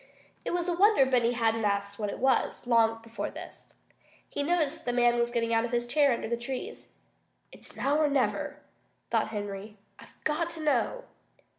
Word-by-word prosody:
It -, -, -3 dB
was 350 Hz, 0 st, -1 dB
a 350 Hz, -, +1 dB
wonder 385 Hz, -5 st, +5 dB
Benny 245 Hz, -2 st, +2 dB
hadn't 225 Hz, -1 st, +1 dB
asked 200 Hz, 0 st, -1 dB
what 210 Hz, -1 st, -1 dB
it -, -, -5 dB
was, 265 Hz, -1 st, +1 dB
long 225 Hz, -1 st, +3 dB
before 225 Hz, -3 st, -4 dB
this. -, -, -11 dB, 0.6 s
He -, -, -3 dB
noticed 325 Hz, 0 st, +1 dB
that 325 Hz, -, -19 dB
the -, -, -4 dB
man 240 Hz, 0 st, +4 dB
was 235 Hz, 0 st, +2 dB
getting 230 Hz, -1 st, 0 dB
out 225 Hz, 0 st, +3 dB
of 240 Hz, -, -2 dB
his 240 Hz, 0 st, 0 dB
chair 285 Hz, +3 st, +3 dB
under 235 Hz, -, -1 dB
the 235 Hz, +1 st, -1 dB
trees. 260 Hz, -, -6 dB, 0.6 s
"It's -, -, -7 dB
now 285 Hz, +3 st, +1 dB
or 310 Hz, -, +4 dB
never," 280 Hz, -3 st, -1 dB, 0.5 s
thought -, -, +2 dB
Henry. 205 Hz, 0 st, -6 dB, 0.2 s
"I've -, -, -15 dB
got 320 Hz, +3 st, 0 dB
to -, -, -6 dB
know!" 300 Hz, -, +1 dB
240 Hz, 190 wpm, -29 LUFS, 225-295 Hz, 0.6 s, wonder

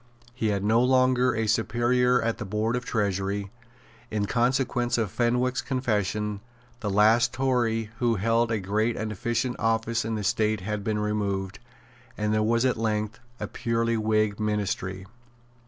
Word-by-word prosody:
He 125 Hz, -3 st, -1 dB
had 100 Hz, -2 st, 0 dB
no 110 Hz, +3 st, +3 dB
longer 130 Hz, -1 st, +3 dB
a 110 Hz, 0 st, 0 dB
superior 120 Hz, +3 st, +2 dB
at 115 Hz, 0 st, -1 dB
the -, -, -3 dB
Board 105 Hz, +4 st, -1 dB
of 125 Hz, -, -2 dB
Treasury. 100 Hz, -3 st, -1 dB, 0.6 s
In 105 Hz, -1 st, -1 dB
consequence 120 Hz, +1 st, +1 dB
of 110 Hz, -5 st, -1 dB
Fenwick's 125 Hz, +1 st, +1 dB
confession, 105 Hz, -5 st, -1 dB, 0.4 s
the 105 Hz, -, -3 dB
last 110 Hz, +4 st, +4 dB
Tory 120 Hz, -4 st, 0 dB
who 120 Hz, -2 st, +2 dB
held 115 Hz, +3 st, +1 dB
a 110 Hz, -, 0 dB
great 105 Hz, +4 st, 0 dB
and 110 Hz, 0 st, -3 dB
efficient 120 Hz, +4 st, -2 dB
office 115 Hz, +1 st, 0 dB
in 110 Hz, 0 st, -2 dB
the 105 Hz, -, -3 dB
State 110 Hz, +1 st, +1 dB
had 105 Hz, +1 st, -3 dB
been 110 Hz, +1 st, -1 dB
removed, 100 Hz, -2 st, -2 dB, 0.6 s
and 105 Hz, 0 st, 0 dB
there 110 Hz, -, +2 dB
was 115 Hz, +3 st, +2 dB
at 125 Hz, -, +1 dB
length 110 Hz, -1 st, -2 dB, 0.2 s
a 105 Hz, -, -2 dB
purely 115 Hz, +2 st, -1 dB
Whig 110 Hz, -1 st, +1 dB
Ministry. 95 Hz, -3 st, -2 dB
110 Hz, 155 wpm, -26 LUFS, 105-120 Hz, 0.6 s, last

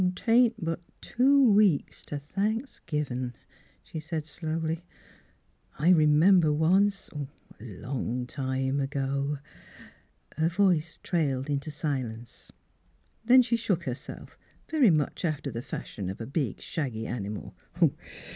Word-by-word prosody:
"'Tain't 235 Hz, +3 st, +4 dB
but 165 Hz, -3 st, -3 dB, 0.2 s
two 265 Hz, -1 st, +4 dB
weeks 200 Hz, -8 st, +3 dB
t' 145 Hz, -, -5 dB
Thanks 210 Hz, -, -2 dB
givin'," 130 Hz, -5 st, -2 dB, 0.5 s
she 160 Hz, -, -7 dB
said 155 Hz, 0 st, -4 dB
slowly. 160 Hz, +1 st, -3 dB, 0.5 s
" -, -, -35 dB
I 160 Hz, +5 st, +3 dB
remember 160 Hz, +1 st, +5 dB
once 190 Hz, +6 st, +2 dB, 0.3 s
— -, -, -24 dB
a -, -, -12 dB
long 125 Hz, +3 st, -4 dB
time 130 Hz, +1 st, -2 dB
ago 140 Hz, +1 st, -1 dB, 0.3 s
— -, -, -19 dB
" -, -, -30 dB
Her 160 Hz, +1 st, +2 dB
voice 175 Hz, -3 st, +2 dB
trailed 145 Hz, -5 st, 0 dB
into 140 Hz, +2 st, -2 dB
silence. 130 Hz, -7 st, -5 dB, 0.7 s
Then 255 Hz, +2 st, +7 dB
she 235 Hz, -1 st, +1 dB
shook 195 Hz, -7 st, 0 dB
herself, 130 Hz, -4 st, -7 dB, 0.3 s
very 300 Hz, -8 st, +4 dB
much 155 Hz, -1 st, 0 dB
after 155 Hz, -5 st, -2 dB
the 115 Hz, -, -4 dB
fashion 105 Hz, -6 st, -6 dB
of 95 Hz, -, -6 dB
a 115 Hz, -, -4 dB
big 135 Hz, -, -2 dB
shaggy 125 Hz, -8 st, -3 dB
animal. 105 Hz, -3 st, -5 dB
155 Hz, 130 wpm, -28 LUFS, 135-185 Hz, 0.7 s, Then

